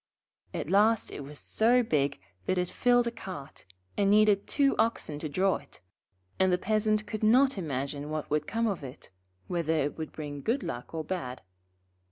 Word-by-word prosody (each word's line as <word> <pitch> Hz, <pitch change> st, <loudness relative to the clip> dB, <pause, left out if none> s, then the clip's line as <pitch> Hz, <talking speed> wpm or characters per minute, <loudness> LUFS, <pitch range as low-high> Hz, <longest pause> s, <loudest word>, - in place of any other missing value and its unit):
At 155 Hz, -, -4 dB
last 215 Hz, +3 st, +3 dB
it 145 Hz, -, -6 dB
was 145 Hz, +2 st, -9 dB
so 240 Hz, +9 st, +3 dB
big 145 Hz, -, 0 dB, 0.3 s
that 185 Hz, -, +1 dB
it 180 Hz, 0 st, 0 dB
filled 245 Hz, -1 st, +3 dB
a 235 Hz, -, -1 dB
cart, 185 Hz, -11 st, -9 dB, 0.3 s
and 200 Hz, -1 st, +2 dB
needed 210 Hz, -1 st, +4 dB
two 275 Hz, -1 st, +2 dB
oxen 160 Hz, -10 st, 0 dB
to 155 Hz, -, -3 dB
draw 185 Hz, +6 st, +2 dB
it; -, -, -13 dB, 0.6 s
and 190 Hz, 0 st, +4 dB
the 180 Hz, -, +3 dB
Peasant 215 Hz, +2 st, +1 dB
could 215 Hz, -, -5 dB
not 255 Hz, +5 st, +5 dB
imagine 145 Hz, -4 st, -3 dB
what 155 Hz, -1 st, -3 dB
would 150 Hz, 0 st, 0 dB
come 230 Hz, +1 st, 0 dB
of 195 Hz, -9 st, -1 dB
it, 130 Hz, -6 st, -10 dB, 0.3 s
whether 165 Hz, -2 st, -1 dB
it 145 Hz, 0 st, -1 dB
would 155 Hz, -, -4 dB
bring 145 Hz, -2 st, -6 dB
good 240 Hz, -, 0 dB
luck 120 Hz, +6 st, -6 dB
or 160 Hz, -, -2 dB
bad. 150 Hz, -, -4 dB
185 Hz, 185 wpm, -29 LUFS, 150-220 Hz, 0.6 s, not